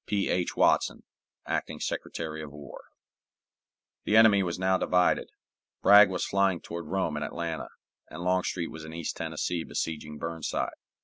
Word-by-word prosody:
P. 100 -2 0
H. 90 -1 0
WATSON, - - +2 0.4
Acting - - -3
Secretary 80 -1 -4
of 75 -2 -8
War. 75 -1 -11 1.2
The 110 - +3
enemy 110 -3 +7
was 85 -3 -2
now 95 +1 +2
divided. 90 0 +2 0.5
Bragg 100 0 +8
was 90 -2 -2
flying 95 -2 +2
toward 85 -1 -7
Rome 95 -3 -1
and 75 - -2
Atlanta, 80 -5 -4 0.4
and 80 +2 -7
Longstreet 90 -1 0
was 80 0 -9
in 80 0 -9
East 85 -2 -4
Tennessee 85 -2 -2
besieging 75 -2 -4
Burnside. 80 -1 -3
85 Hz, 145 wpm, -28 LUFS, 80-95 Hz, 1.2 s, Bragg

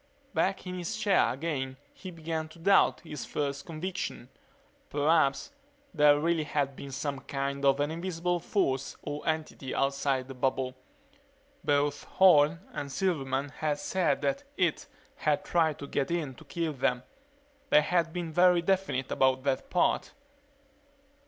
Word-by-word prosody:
Back 195 0 0
in 180 0 -5
his 175 - -3
chair 200 -3 +3
again 135 -2 -3 0.2
he 185 - -9
began 160 -2 -4
to 155 - -15
doubt 195 +4 +4
his 150 -4 -7
first 140 -1 -3
conviction. 170 -6 -5 0.6
Perhaps 150 - +2 0.4
there 150 -2 +5
really 165 +1 +1
had 140 -2 -1
been 140 - -8
some 140 +1 -3
kind 140 +1 -3
of 135 0 +4
an 145 +2 0
invisible 175 +1 -2
force 140 -7 -1
or 145 0 -4
entity 155 -4 -3
outside 135 -1 0
the 135 - -7
bubble. 130 0 -1 0.9
Both 145 0 +1
Horne 165 -3 +5
and 140 -1 -5
Silverman 140 -6 -1
had 150 +1 -2
said 185 +4 0
that 275 +1 0
"it" 175 -4 0 0.3
had 150 -1 0
tried 160 -3 +2
to - - -7
get 140 -1 -1
in 165 -6 -2
to 160 - -15
kill 165 +1 -2
them. 125 -2 0 0.7
They 150 - +6
had 165 +1 +1
been 170 -2 -4
very 175 0 +5
definite 185 -8 0
about 130 0 +2
that 135 -1 -1
part. 180 - +1
150 Hz, 145 wpm, -29 LUFS, 140-170 Hz, 0.9 s, They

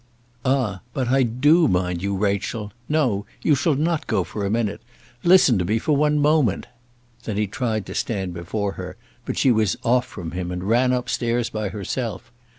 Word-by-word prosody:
"Ah, 125 -8 0
but 130 -3 -1
I 135 +1 +4
do 145 +8 +4
mind 90 -3 0
you. 100 +1 -1
Rachel 105 +1 -2 0.2
no; 130 -10 +1 0.2
you 155 - +4
shall 145 +2 +2
not 160 +2 0
go - - +1
for 105 - -5
a 100 - 0
minute. 110 -1 -1 0.4
Listen 170 - +6
to 90 - 0
me 105 +5 +1
for 145 +6 +1
one 150 +1 +2
moment." 145 - +2 0.6
Then 105 -3 -3
he 105 - +2
tried 110 0 -2
to - - -7
stand 95 -5 -2
before 95 +4 -3
her, 90 0 -8 0.3
but - - -3
she 135 - +4
was 110 -4 +2
off 125 +1 +2
from 85 -8 -7
him, 90 0 -4
and 90 0 -4
ran 120 +5 +3
up 125 -1 -1
stairs 120 0 -1
by 110 -2 -2
herself. 115 +3 -4
115 Hz, 190 wpm, -23 LUFS, 100-130 Hz, 0.6 s, Listen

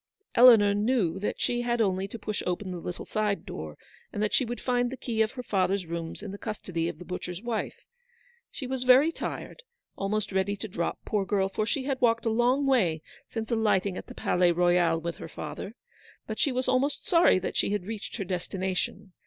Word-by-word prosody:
Eleanor 225 -5 +8
knew 205 -5 +1
that 205 - -2
she 240 0 0
had 240 0 0
only 190 -3 +1
to 220 - -7
push 215 -1 -3
open 185 +2 -2
the 180 - -5
little 175 +1 -6
side 210 -2 -1
door, 75 -1 -7 0.3
and 205 - -2
that 210 - 0
she - - +4
would 240 -1 -4
find 245 -1 +1
the 265 - -6
key 225 -4 -1
of 220 0 +1
her 250 - -6
father's 190 -3 +1
rooms 165 +3 -5
in 205 - -5
the 200 - -8
custody 180 -6 -3
of - - -7
the 180 - -10
butcher's 180 +2 -5
wife. 235 -2 -3 0.6
She 270 - -7
was 260 0 -3
very 255 +5 +6
tired, - - -6 0.3
almost 205 +1 -2
ready 190 +1 +1
to 205 +2 -6
drop, 170 -3 -3
poor 210 -2 0
girl, 195 -1 +1
for 215 +2 -2
she 265 +3 -1
had 270 -1 -2
walked 230 -1 +3
a - - +3
long 245 +5 +2
way 180 - +2 0.3
since 225 +1 -4
alighting 205 -4 +2
at - - -7
the - - -10
Palais 180 -1 +2
Royal 175 -1 +3
with 170 +1 -4
her - - -8
father; 155 +9 -7 0.5
but 220 - -5
she 280 - +2
was 255 0 -1
almost 270 +3 +1
sorry 335 - +5
that 185 - -3
she - - +1
had 205 -3 -1
reached 215 0 -6
her 200 - -2
destination. 185 +1 -3
205 Hz, 210 wpm, -28 LUFS, 180-240 Hz, 0.6 s, Eleanor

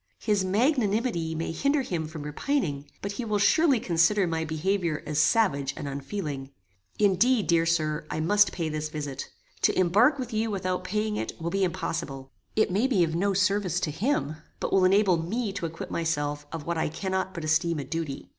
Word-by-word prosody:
His 210 -3 +1
magnanimity 210 - +1
may 165 +1 -2
hinder 280 - +1
him 165 -8 -3
from 155 -1 -7
repining, 150 - -2
but 200 - -2
he 225 +5 -4
will 215 -2 0
surely 275 +5 +4
consider 180 +3 +3
my 165 -1 -1
behaviour 160 +1 -1
as 150 -1 -1
savage 140 -8 +2
and - - -5
unfeeling. 140 0 -4 0.5
Indeed, 210 +3 +3
dear 165 -1 +3
Sir, 155 -2 0
I - - -3
must 205 +6 +4
pay 165 -3 -3
this 155 0 -3
visit. 145 -3 -5 0.3
To - - +2
embark 210 - +4
with 250 -3 -5
you 220 +1 0
without 185 -3 -2
paying 210 +1 -1
it, - - -4
will 170 +1 -3
be 195 0 +1
impossible. 160 -6 -3 0.2
It 215 -3 +2
may 210 +8 +2
be 210 -10 +3
of 160 -1 -1
no 195 +4 +1
service 195 -2 +1
to 155 - -1
him, 165 - -1 0.2
but - - -2
will 190 -1 +5
enable 190 -1 +4
me 200 +6 -2
to 180 -4 -3
acquit 165 +1 -8
myself 145 -3 -2
of 160 -3 -6
what 170 -1 -1
I - - 0
cannot 190 +3 -3
but 170 - -5
esteem 160 +2 +1
a 145 - -3
duty. 150 0 -4
175 Hz, 195 wpm, -27 LUFS, 155-205 Hz, 0.5 s, will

